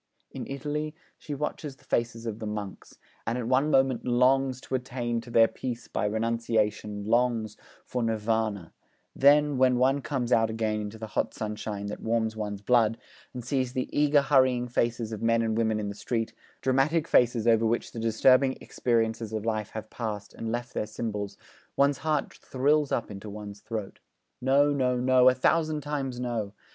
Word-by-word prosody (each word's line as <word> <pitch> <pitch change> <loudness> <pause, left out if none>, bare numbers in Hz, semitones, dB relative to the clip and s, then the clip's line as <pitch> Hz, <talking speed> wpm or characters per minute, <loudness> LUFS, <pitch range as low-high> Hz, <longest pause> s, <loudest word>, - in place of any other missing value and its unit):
In - - -6
Italy 150 +2 -3 0.2
she 145 - -5
watches 150 0 -4
the - - -26
faces 115 0 -1
of 110 -1 -4
the 110 - -4
monks, 105 -2 -6 0.3
and 115 - 0
at 120 -2 -3
one 130 +4 +3
moment 130 -4 +2
longs 130 +1 +2
to - - -9
attain 125 -2 -2
to 115 - -13
their 115 -1 +6
peace 120 -1 -6
by - - -2
renunciation, 110 -2 -1
longs 115 -1 +1 0.3
for 125 - -3
Nirvana; 110 -5 -1 0.4
'then, 145 0 +5
when 130 -1 +4
one 135 +3 +3
comes 125 -2 -2
out 115 -2 +4
again 110 -1 -1
into 105 +1 -6
the 110 - -6
hot - - -1
sunshine 105 -1 -4
that 100 - -5
warms 110 -1 0
one's 105 -2 -5
blood, 115 -1 +3 0.3
and 125 -2 -7
sees 130 -1 -1
the 130 -1 -3
eager 145 -1 +4
hurrying 130 -3 +3
faces 120 -1 -1
of 110 - -5
men 115 0 +2
and 110 -1 0
women 110 -1 +1
in 105 -1 -3
the - - -4
street, 115 +2 -3 0.3
dramatic 145 +5 +2
faces 120 -2 +3
over 115 -1 +4
which 115 +1 -1
the 115 - -7
disturbing 130 +4 +4
experiences 115 -2 -1
of 110 -1 -3
life 110 -2 -1
have 110 0 -8
passed 105 -3 -5
and 115 -1 -5
left 120 +1 -4
their 105 - -2
symbols, 105 -2 -4 0.4
one's 140 -1 +3
heart 155 -2 -1
thrills 145 +2 +1
up 115 - -1
into 100 +1 -8
one's 105 0 -8
throat. 110 -3 -6 0.4
No, 140 +3 +4
no, 125 -3 +1
no, 130 0 +5
a 130 - +1
thousand 155 +3 +1
times 140 -4 -3
no! 115 -5 -3
120 Hz, 180 wpm, -27 LUFS, 110-130 Hz, 0.4 s, their